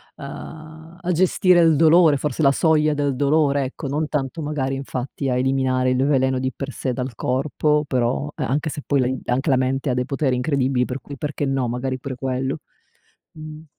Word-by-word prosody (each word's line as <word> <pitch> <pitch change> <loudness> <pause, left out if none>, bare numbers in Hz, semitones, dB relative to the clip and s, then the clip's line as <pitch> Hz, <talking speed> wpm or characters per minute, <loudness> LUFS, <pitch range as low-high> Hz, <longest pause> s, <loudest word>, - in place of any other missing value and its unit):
uhm 160 +3 -10
a 180 0 -1
gestire 180 +1 +3
il 165 -2 +5
dolore 160 -1 +5
forse 150 0 -3
la 140 - +6
soglia 155 0 +2
del 145 -2 -1
dolore 145 0 +2
ecco, 140 +2 -6
non 150 +3 -1
tanto 150 +1 -3
magari 145 -3 -2
infatti 135 0 -4
a 125 - +1
eliminare 130 -1 +1
il 130 +2 +1
veleno 130 -2 +2
di 130 0 -1
per 140 0 -5
sé 130 -2 -3
dal 125 0 -4
corpo; 150 +4 0
però 130 +3 -1
e 150 - -3
anche 145 +5 -1
se 145 -1 -6
poi 140 -1 +1
la 125 - +1
in 130 0 -2
anche 130 +4 0
la 130 - +4
mente 135 +2 0
ha - - +1
dei 125 0 0
poteri 135 -2 0
incredibili, 130 -2 +1
per 125 +1 -5
cui 140 -2 -9
perché 145 0 -3
no 135 -2 0
magari 130 +2 -3
pure 130 0 -6
quello. 130 +2 -2 0.7
Mh. 155 0 -10
140 Hz, 200 wpm, -22 LUFS, 130-150 Hz, 0.7 s, la